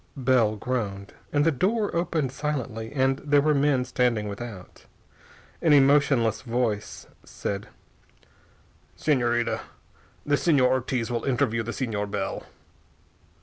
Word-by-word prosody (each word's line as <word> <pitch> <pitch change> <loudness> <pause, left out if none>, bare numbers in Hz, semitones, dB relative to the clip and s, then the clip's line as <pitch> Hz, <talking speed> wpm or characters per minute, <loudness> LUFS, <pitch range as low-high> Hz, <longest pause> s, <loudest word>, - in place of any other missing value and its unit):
Bell 125 -5 +2
groaned. 100 -4 -4 0.2
And 145 0 +2
the 165 - +4
door 200 - 0
opened 165 -6 0
silently, 130 -6 -4
and 135 -1 +1
there 145 -1 +3
were 150 +2 +3
men 140 -3 +2
standing 120 -4 0
without. 100 -3 -8 0.8
An 160 -3 +4
emotionless 135 -5 +4
voice 115 -4 -2 0.2
said: 100 0 -5 1.3
"Señorita, 120 -5 +1 0.7
the 145 - +3
Señor 145 -6 +3
Ortiz 130 -2 -1
will 120 -1 -2
interview 125 -3 +1
the 115 - -6
Señor 105 -5 -3
Bell." - - -4
125 Hz, 115 wpm, -26 LUFS, 115-145 Hz, 1.3 s, the